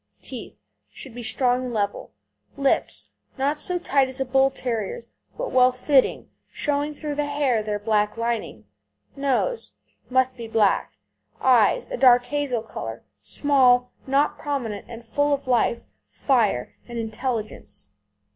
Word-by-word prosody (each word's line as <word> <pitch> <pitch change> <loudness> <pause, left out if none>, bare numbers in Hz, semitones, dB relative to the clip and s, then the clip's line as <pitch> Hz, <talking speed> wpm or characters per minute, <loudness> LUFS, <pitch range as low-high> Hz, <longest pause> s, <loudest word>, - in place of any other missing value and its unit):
TEETH 235 - -8 0.3
Should 235 - -11
be 245 - -7
strong 245 +2 +1
and 245 - -4
level. 205 -1 -2 0.5
LIPS 275 -1 0 0.3
Not 285 +3 0
so 360 - +3
tight 275 -6 +2
as 260 +1 -2
a 265 - 0
Bull 265 +1 +3
terrier's, 260 - -4 0.3
but - - -3
well 255 0 +5
fitting, 260 +2 +2 0.2
showing 295 0 -1
through 300 0 -4
the 290 0 -1
hair 285 -6 +1
their 210 -1 -2
black 210 0 0
lining. 230 - -3 0.5
NOSE 280 - -1 0.4
Must 260 0 +2
be 235 -2 -7
black. 220 -3 +2 0.5
EYES 240 -5 +4
A - - -2
dark 245 -1 +6
hazel 270 -4 -2
colour, 115 - -7 0.2
small, 250 - +3 0.2
not 280 +2 +2
prominent, 245 -9 -3
and 235 0 -9
full 285 +5 +1
of 280 - -11
life, 235 -1 +2 0.3
fire, 220 - +1
and 240 -1 -7
intelligence. 220 - -4
250 Hz, 140 wpm, -24 LUFS, 225-280 Hz, 0.5 s, dark